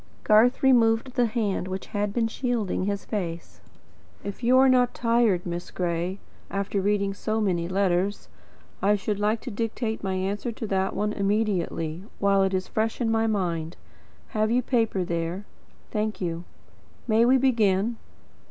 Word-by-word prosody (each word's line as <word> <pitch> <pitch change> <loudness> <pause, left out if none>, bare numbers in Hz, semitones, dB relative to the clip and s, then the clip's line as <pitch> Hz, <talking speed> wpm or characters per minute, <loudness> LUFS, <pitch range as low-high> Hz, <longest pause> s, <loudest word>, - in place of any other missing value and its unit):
Garth 225 +5 +4
removed 240 -1 +4
the 245 -2 +2
hand 210 -5 -1
which 190 0 -5
had 205 -1 0
been 225 +1 +1
shielding 225 -6 -1
his 200 0 -2
face. 170 -6 -5 0.6
"If 200 +3 -6
you 250 +2 +4
are 265 +1 +6
not 250 -1 +3
tired, 230 -6 +2
Miss 175 0 -4
Gray, 175 +1 -2 0.3
after 200 0 -1
reading 200 0 +1
so 215 +2 -2
many 175 -5 0
letters, 190 +1 0 0.5
I 205 +1 +4
should 205 0 -2
like 215 +2 +1
to - - -6
dictate 225 +1 -3
my 190 -1 -1
answer 200 +5 -2
to 225 - -6
that 195 -2 -1
one 210 0 0
immediately, 195 -5 -1
while 200 -1 +3
it 190 0 +1
is 185 0 -2
fresh 220 +1 -1
in 230 -2 +1
my 225 0 +2
mind. 170 -6 -2 0.5
Have 215 0 0
you 245 +2 +2
paper 225 -7 +1
there? 170 +3 -3 0.5
Thank 215 0 -2
you. 170 -1 -3 0.6
May 225 0 +4
we 255 +2 +5
begin? 230 -4 +2
205 Hz, 160 wpm, -26 LUFS, 190-225 Hz, 0.6 s, are